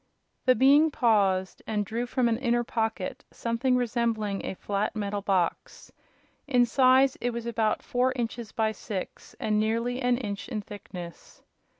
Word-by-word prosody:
The 255 Hz, -, +6 dB
Being 285 Hz, +5 st, +6 dB
paused, 200 Hz, -9 st, +1 dB
and 210 Hz, -2 st, -1 dB
drew 230 Hz, +4 st, -3 dB
from 245 Hz, 0 st, +1 dB
an 225 Hz, 0 st, 0 dB
inner 240 Hz, -2 st, +1 dB
pocket 225 Hz, -5 st, -3 dB
something 240 Hz, +2 st, 0 dB
resembling 230 Hz, -4 st, -1 dB
a -, -, -4 dB
flat 200 Hz, +3 st, -2 dB
metal 205 Hz, -1 st, -2 dB
box. 190 Hz, -4 st, -1 dB, 0.6 s
In 250 Hz, -3 st, +4 dB
size 260 Hz, +2 st, +4 dB
it 245 Hz, -, +1 dB
was 235 Hz, -1 st, -5 dB
about 225 Hz, -2 st, 0 dB
four 250 Hz, +1 st, +1 dB
inches 235 Hz, -2 st, -4 dB
by 220 Hz, -1 st, 0 dB
six, 205 Hz, -3 st, -7 dB
and 215 Hz, -1 st, +1 dB
nearly 230 Hz, +4 st, 0 dB
an 245 Hz, -1 st, +2 dB
inch 205 Hz, -5 st, -5 dB
in 220 Hz, -5 st, -3 dB
thickness. 180 Hz, -4 st, -10 dB
230 Hz, 155 wpm, -27 LUFS, 210-245 Hz, 0.6 s, The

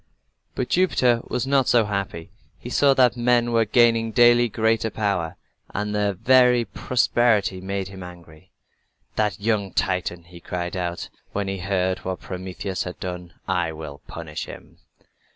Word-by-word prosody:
But 125 Hz, -, -2 dB
Jupiter 125 Hz, -10 st, +3 dB
was 125 Hz, +1 st, -2 dB
not 135 Hz, -1 st, +2 dB
so 115 Hz, -3 st, +4 dB
happy. 100 Hz, -5 st, -4 dB, 0.3 s
He -, -, -9 dB
saw 140 Hz, -1 st, +4 dB
that 125 Hz, -2 st, +4 dB
men 120 Hz, 0 st, +2 dB
were 115 Hz, -1 st, +3 dB
gaining 115 Hz, 0 st, +3 dB
daily 120 Hz, 0 st, +5 dB
greater 110 Hz, +1 st, +1 dB
power, 100 Hz, -6 st, -1 dB, 0.4 s
and 105 Hz, +1 st, -2 dB
their 105 Hz, -1 st, +1 dB
very 125 Hz, +3 st, +4 dB
prosperity 115 Hz, -7 st, +1 dB
made 95 Hz, 0 st, -3 dB
him 95 Hz, -1 st, -10 dB
angry. 90 Hz, -1 st, -13 dB, 0.6 s
"That 105 Hz, -5 st, 0 dB
young 105 Hz, -2 st, 0 dB
Titan!" 90 Hz, -3 st, -1 dB
he 85 Hz, 0 st, -14 dB
cried 90 Hz, +1 st, -4 dB
out, 90 Hz, -1 st, -3 dB, 0.2 s
when 100 Hz, -1 st, -2 dB
he 95 Hz, 0 st, -3 dB
heard 95 Hz, 0 st, 0 dB
what 95 Hz, 0 st, -4 dB
Prometheus 95 Hz, +1 st, -5 dB
had 90 Hz, -, -5 dB
done. 90 Hz, -2 st, -6 dB
"I 80 Hz, -, 0 dB
will 75 Hz, -2 st, -9 dB
punish 80 Hz, -2 st, -6 dB
him." -, -, -12 dB
100 Hz, 150 wpm, -23 LUFS, 90-120 Hz, 0.6 s, daily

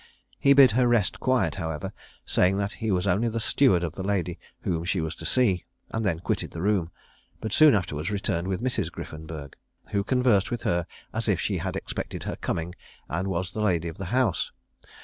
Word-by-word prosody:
He 140 Hz, -, +6 dB
bid 135 Hz, -3 st, +8 dB
her 125 Hz, +3 st, +3 dB
rest 115 Hz, -6 st, +2 dB
quiet, 130 Hz, -1 st, +2 dB
however, 80 Hz, -2 st, -4 dB, 0.3 s
saying 95 Hz, +2 st, +3 dB
that 100 Hz, 0 st, -1 dB
he 110 Hz, -, -3 dB
was 90 Hz, -2 st, +1 dB
only 110 Hz, +6 st, +2 dB
the 115 Hz, +1 st, -2 dB
steward 110 Hz, -5 st, +3 dB
of 80 Hz, -3 st, -2 dB
the 95 Hz, -, -6 dB
lady 95 Hz, -3 st, -1 dB, 0.2 s
whom 85 Hz, -2 st, -1 dB
she 90 Hz, +2 st, 0 dB
was 80 Hz, -1 st, -2 dB
to -, -, -6 dB
see, 105 Hz, -9 st, +2 dB, 0.3 s
and 110 Hz, -, -1 dB
then 90 Hz, -6 st, 0 dB
quitted -, -, -1 dB
the 85 Hz, -, -6 dB
room, 100 Hz, -5 st, +2 dB, 0.5 s
but 110 Hz, -2 st, -4 dB
soon 155 Hz, -5 st, +7 dB
afterwards 80 Hz, -5 st, -2 dB
returned 100 Hz, -4 st, -1 dB
with 95 Hz, +4 st, -2 dB
Mrs. 130 Hz, -1 st, 0 dB
Griffenburg, 80 Hz, -2 st, -8 dB, 0.4 s
who 100 Hz, -2 st, 0 dB
conversed 125 Hz, -4 st, +3 dB
with 120 Hz, -, -3 dB
her 85 Hz, -1 st, 0 dB, 0.3 s
as -, -, -1 dB
if -, -, +2 dB
she -, -, -1 dB
had -, -, -3 dB
expected -, -, -4 dB
her -, -, -3 dB
coming 85 Hz, +2 st, -3 dB, 0.4 s
and 85 Hz, +4 st, -1 dB
was 90 Hz, -1 st, -2 dB
the 110 Hz, -, -2 dB
lady 85 Hz, -5 st, +1 dB
of 80 Hz, -, -10 dB
the 95 Hz, -, -3 dB
house. 125 Hz, +5 st, +1 dB
95 Hz, 205 wpm, -26 LUFS, 85-115 Hz, 0.5 s, bid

